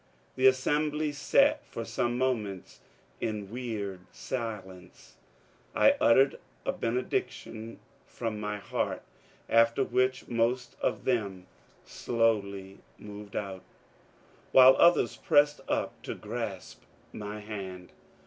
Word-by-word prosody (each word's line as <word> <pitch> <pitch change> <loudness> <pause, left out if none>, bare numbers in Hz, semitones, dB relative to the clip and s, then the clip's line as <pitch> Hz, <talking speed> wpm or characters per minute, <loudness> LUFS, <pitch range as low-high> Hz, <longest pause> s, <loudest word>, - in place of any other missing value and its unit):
The 130 0 +5
assembly 150 +3 +1
sat 145 - +3
for - - -6
some 120 0 -1
moments 110 - -2 0.4
in 105 -3 -3
weird 110 -6 -4
silence. 95 -7 -7 0.6
I - - +6
uttered 135 +4 +5 0.3
a - - +1
benediction 115 -1 -3 0.3
from 115 -3 -4
my 105 0 -3
heart, 100 - -3 0.4
after 115 +3 +4
which 130 +1 0
most 120 +1 0
of - - -1
them 100 -7 -1 0.4
slowly 100 -4 -1 0.2
moved 105 -1 -10
out, 95 -2 -4 0.9
while 130 0 +9
others 175 +1 +4
pressed 145 0 +3
up - - -2
to - - -5
grasp 110 -3 -6 0.3
my 105 0 -6
hand. 95 -4 -7
115 Hz, 105 wpm, -29 LUFS, 100-130 Hz, 0.9 s, while